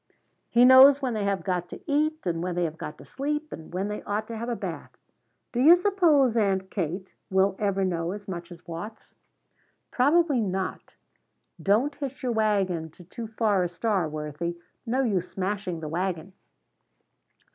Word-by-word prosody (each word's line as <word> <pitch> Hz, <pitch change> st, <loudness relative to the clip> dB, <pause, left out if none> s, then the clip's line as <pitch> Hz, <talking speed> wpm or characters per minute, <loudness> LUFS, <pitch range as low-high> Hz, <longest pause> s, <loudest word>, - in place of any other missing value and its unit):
He 240 Hz, +1 st, +5 dB
knows 265 Hz, +2 st, +9 dB
when 260 Hz, -4 st, -2 dB
they 210 Hz, -2 st, -1 dB
have 200 Hz, -1 st, -1 dB
got 180 Hz, -2 st, -2 dB
to -, -, -8 dB
eat 305 Hz, +2 st, 0 dB
and 165 Hz, -2 st, -1 dB
when 180 Hz, 0 st, -2 dB
they 175 Hz, -, 0 dB
have 160 Hz, -1 st, -3 dB
got 150 Hz, -, -6 dB
to -, -, -13 dB
sleep, 295 Hz, +3 st, -3 dB
and 160 Hz, -, -10 dB
when 185 Hz, +3 st, -2 dB
they 210 Hz, 0 st, -4 dB
ought 210 Hz, +1 st, -2 dB
to 230 Hz, -, -5 dB
have 230 Hz, +2 st, -4 dB
a 240 Hz, -, -1 dB
bath. -, -, -6 dB, 0.6 s
Do 240 Hz, -, -2 dB
you 320 Hz, +6 st, +9 dB
suppose, 345 Hz, -, +3 dB
Aunt 195 Hz, -3 st, +1 dB
Kate, 185 Hz, +1 st, -4 dB, 0.2 s
we'll 190 Hz, 0 st, +2 dB
ever 195 Hz, -2 st, +1 dB
know 170 Hz, -2 st, -1 dB
as 200 Hz, +1 st, -8 dB
much 175 Hz, -2 st, -6 dB
as 175 Hz, +1 st, -13 dB
Watts?" 175 Hz, +7 st, -8 dB, 0.8 s
"Probably 290 Hz, +1 st, +3 dB
not. 190 Hz, -2 st, -3 dB, 0.7 s
Don't 225 Hz, +9 st, +2 dB
hitch 275 Hz, -2 st, -6 dB
your 250 Hz, -, 0 dB
wagon 195 Hz, -7 st, 0 dB
to 170 Hz, +3 st, -16 dB
too 225 Hz, +6 st, -7 dB
far 215 Hz, -3 st, +1 dB
a 180 Hz, -, +1 dB
star, 185 Hz, -2 st, -1 dB
Worthie. 155 Hz, +3 st, -4 dB, 0.3 s
No 255 Hz, +4 st, +1 dB
use 190 Hz, -7 st, 0 dB
smashing 190 Hz, -3 st, -3 dB
the 155 Hz, -, -5 dB
wagon." 180 Hz, +2 st, -3 dB
200 Hz, 180 wpm, -26 LUFS, 180-245 Hz, 0.8 s, knows